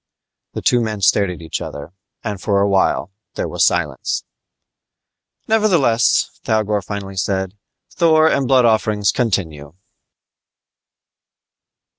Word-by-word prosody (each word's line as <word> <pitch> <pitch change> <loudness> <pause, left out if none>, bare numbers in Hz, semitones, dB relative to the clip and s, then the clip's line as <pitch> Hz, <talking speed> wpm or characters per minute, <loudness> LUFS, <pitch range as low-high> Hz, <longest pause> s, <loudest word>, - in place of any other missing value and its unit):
The - - -6
two 125 - +3
men 110 -3 -3
stared 100 +1 +3
at 90 -2 -8
each 80 - -4
other, 75 +4 -8 0.3
and 105 -4 -5
for 100 0 +1
awhile 100 -1 +1 0.2
there - - -2
was - - 0
silence. - - 0 1.2
"Nevertheless," 175 - +2
Thougor 105 -2 0
finally 95 -1 -7
said, 95 0 -2 0.4
"Thor 160 -2 +3
and 140 -4 +1
blood 130 -2 +4
offerings 110 -2 +2
continue!" 80 - -2
105 Hz, 110 wpm, -18 LUFS, 95-120 Hz, 1.2 s, blood